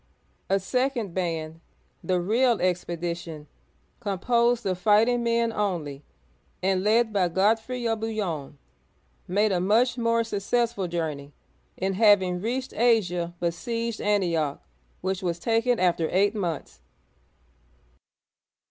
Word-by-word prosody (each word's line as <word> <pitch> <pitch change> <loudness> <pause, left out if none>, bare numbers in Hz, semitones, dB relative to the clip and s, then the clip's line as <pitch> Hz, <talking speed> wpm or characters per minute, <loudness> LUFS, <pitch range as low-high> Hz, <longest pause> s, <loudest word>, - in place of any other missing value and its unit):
A 195 +1 +3
second 250 -1 -1
band, 165 -3 -3 0.2
— - - -40
the 185 -1 +1
real 230 +5 +2
expedition, 170 -3 -3 0.3
— - - -39
composed 235 +3 +1
of 185 -2 -1
fighting 220 +5 +4
men 235 -1 +1
only, 165 -10 -2 0.6
and 190 0 +1
led 220 +1 +3
by 190 -3 +2
Godfrey 225 +7 +1
of 225 -1 0
Bouillon 190 -11 -3 0.7
(boo 180 - -7
y6N'), - - -2
made 210 +1 +3
a 180 - +1
much 230 +7 +2
more 230 0 +2
successful 225 -1 -1
journey, 155 -4 -4 0.4
and 190 +1 -1
having 190 -5 +4
reached 255 +5 -3
Asia, 180 -8 +1
besieged 230 +7 -2
Antioch(an'ti 170 -8 +1
6k), - - -32 0.4
which 190 +1 -2
was 175 -2 -1
taken 230 +5 +1
after 170 -3 +1
eight 200 +3 +3
months. 175 -8 -4
195 Hz, 130 wpm, -26 LUFS, 175-230 Hz, 0.7 s, fighting